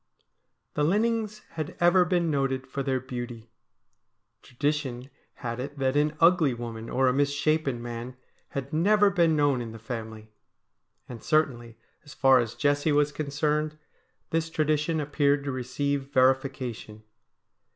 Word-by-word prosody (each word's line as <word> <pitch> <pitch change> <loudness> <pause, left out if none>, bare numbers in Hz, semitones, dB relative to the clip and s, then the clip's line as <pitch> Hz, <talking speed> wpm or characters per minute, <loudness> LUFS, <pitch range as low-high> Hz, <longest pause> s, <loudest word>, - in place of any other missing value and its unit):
The 150 - 0
Linnings 215 +4 0
had 155 -2 -6
ever 175 +1 +5
been 175 -2 +1
noted 135 -2 -1
for 135 +1 -4
their 135 -1 0
beauty. 120 -3 -7 0.9
Tradition 135 -1 -3 0.2
had 115 -2 -5
it 140 +3 -6
that 135 0 0
an 150 +1 +1
ugly 165 -6 +4
woman 115 -1 -7
or 130 +1 +2
a 125 - +3
mis 140 +1 +2
shapen 145 -3 0
man 120 +1 -6 0.3
had 140 +2 -5
never 205 +5 +4
been 170 -4 +3
known 145 -4 +2
in 115 -2 -6
the - - -8
family. 110 -2 -7 0.8
And 120 -3 -9
certainly, 120 -7 0 0.3
as 145 - -13
far 135 -1 +5
as 115 -1 -2
Jessie 145 +4 +1
was 145 0 +3
concerned, 150 +1 -1 0.5
this 165 0 0
tradition 155 0 0
appeared 145 -1 +1
to 140 - -3
receive 135 +2 -2
verification. 130 -5 0
140 Hz, 140 wpm, -27 LUFS, 125-155 Hz, 0.9 s, ever